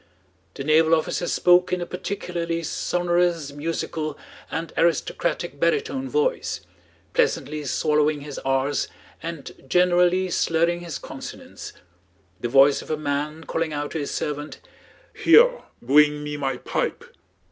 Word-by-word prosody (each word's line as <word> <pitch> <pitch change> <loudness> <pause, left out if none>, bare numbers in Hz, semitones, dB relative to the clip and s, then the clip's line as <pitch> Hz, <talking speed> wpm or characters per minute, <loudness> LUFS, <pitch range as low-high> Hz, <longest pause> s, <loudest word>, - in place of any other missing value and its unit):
The 135 - -5
naval 160 +2 +5
officer 165 +2 -2
spoke 180 0 +4
in 180 - +1
a 175 - -3
particularly 175 -3 -3
sonorous, 175 -2 0
musical, 155 0 -3 0.3
and 165 +1 -4
aristocratic 170 0 0
baritone 345 - 0
voice, 470 +3 0 0.5
pleasantly 155 - 0
swallowing 150 +1 +1
his 145 -1 -7
r's 135 +1 0 0.3
and 165 -3 -6 0.2
generally 180 +1 +3
slurring 170 +1 +1
his 170 -4 -6
consonants: - - -9 0.7
the 120 - -3
voice 135 +2 +5
of - - -13
a 155 - 0
man 150 +2 -3
calling 165 -1 -2
out 145 0 -3
to 160 - -3
his 145 - -3
servant, 150 0 -4 0.5
"Heah! - - +5 0.2
Bwing 150 +3 +4
me 150 0 -4
my 135 -3 -2
pipe!" - - -2
160 Hz, 125 wpm, -24 LUFS, 145-175 Hz, 0.7 s, naval